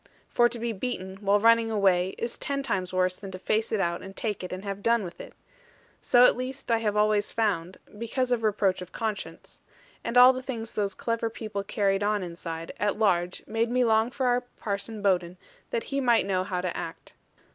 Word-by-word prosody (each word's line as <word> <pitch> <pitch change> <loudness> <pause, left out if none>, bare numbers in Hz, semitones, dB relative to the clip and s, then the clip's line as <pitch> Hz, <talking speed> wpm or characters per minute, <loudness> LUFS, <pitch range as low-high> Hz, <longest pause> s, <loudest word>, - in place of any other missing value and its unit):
For 240 0 +4
to 240 - -5
be 235 0 -2
beaten, 190 -4 -4
while 200 0 +2
running 230 +1 +5
away, 190 -4 +2
is 235 0 -3
ten 275 -1 -3
times 185 -8 -2
worse 185 0 +1
than 195 - -8
to 185 - -6
face 215 +4 0
it 220 - +1
out, 170 -2 0
and 195 0 -10
take 210 -4 -3
it, 180 - -6
and 185 +1 -5
have 200 -1 -5
done 230 0 +2
with 175 -2 -8
it. - - -11 0.7
So 245 - +5
at - - +5
least 255 +1 -5
I 230 - +3
have 210 -2 -1
always 210 -1 +2
found, 190 -5 -1 0.2
because 245 +4 -2
of 240 -2 +2
reproach 200 -4 +1
of 180 - -9
conscience: 220 -3 -5 0.4
and 235 +1 -1
all 250 +1 +9
the 255 - -5
things 235 -3 -5
those 200 -2 -1
clever 230 -1 -1
people 215 -3 -5
carried 195 -1 0
on 205 -1 +1
inside, 165 -1 -6
at 205 +1 0
large, 180 -4 +1
made 225 +1 0
me 250 +1 +2
long 220 0 +3
for 260 +1 -3
our 245 0 +3
Parson 210 -2 -5
Bowden 180 -2 +1 0.3
that 475 -2 -2
he 275 - +1
might 240 -3 +3
know 185 -2 0
how 185 -1 -2
to 180 -1 -3
act. 165 - -7
210 Hz, 210 wpm, -27 LUFS, 190-230 Hz, 0.7 s, all